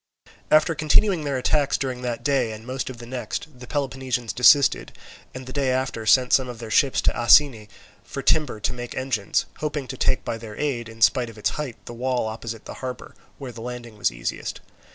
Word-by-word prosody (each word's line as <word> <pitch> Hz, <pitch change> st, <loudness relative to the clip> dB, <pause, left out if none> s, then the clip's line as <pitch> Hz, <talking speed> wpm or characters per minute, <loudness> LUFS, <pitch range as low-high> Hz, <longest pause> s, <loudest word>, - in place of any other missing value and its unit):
After 155 Hz, +2 st, +5 dB
continuing 155 Hz, +3 st, +2 dB
their 140 Hz, -2 st, -1 dB
attacks 140 Hz, +2 st, +1 dB
during 130 Hz, -2 st, -3 dB
that 120 Hz, -2 st, -3 dB
day 135 Hz, -5 st, +1 dB
and 110 Hz, +1 st, -10 dB
most 130 Hz, +1 st, -4 dB
of 130 Hz, -, -8 dB
the 120 Hz, -, -10 dB
next, 125 Hz, +3 st, -6 dB
the 125 Hz, -, -10 dB
Peloponnesians 130 Hz, -4 st, -2 dB
desisted, 140 Hz, +2 st, +5 dB, 0.4 s
and 130 Hz, 0 st, -7 dB
the 130 Hz, -, -8 dB
day 140 Hz, -2 st, 0 dB
after 130 Hz, -4 st, -1 dB
sent 125 Hz, +5 st, +5 dB
some 130 Hz, -2 st, +4 dB
of 120 Hz, -, -7 dB
their 115 Hz, -1 st, -8 dB
ships 135 Hz, +4 st, +3 dB
to -, -, +2 dB
Asine 120 Hz, -2 st, +5 dB, 0.4 s
for 140 Hz, -, -6 dB
timber 150 Hz, -8 st, +2 dB
to 125 Hz, -, -1 dB
make 120 Hz, -1 st, -7 dB
engines, 130 Hz, -6 st, 0 dB
hoping 150 Hz, -3 st, -3 dB
to 130 Hz, -, -5 dB
take -, -, +1 dB
by 115 Hz, -, -3 dB
their 110 Hz, -2 st, -9 dB
aid, 125 Hz, -6 st, -2 dB
in 115 Hz, 0 st, -3 dB
spite 125 Hz, -2 st, +4 dB
of 110 Hz, -, -13 dB
its 105 Hz, -, 0 dB
height, 145 Hz, -6 st, -5 dB
the -, -, -8 dB
wall 125 Hz, 0 st, -1 dB
opposite 110 Hz, 0 st, -6 dB
the -, -, -7 dB
harbour, 130 Hz, -1 st, -6 dB, 0.2 s
where 135 Hz, -3 st, -7 dB
the 115 Hz, -1 st, -10 dB
landing 120 Hz, -1 st, -7 dB
was 105 Hz, -, +1 dB
easiest. -, -, -4 dB
125 Hz, 210 wpm, -24 LUFS, 115-140 Hz, 0.4 s, After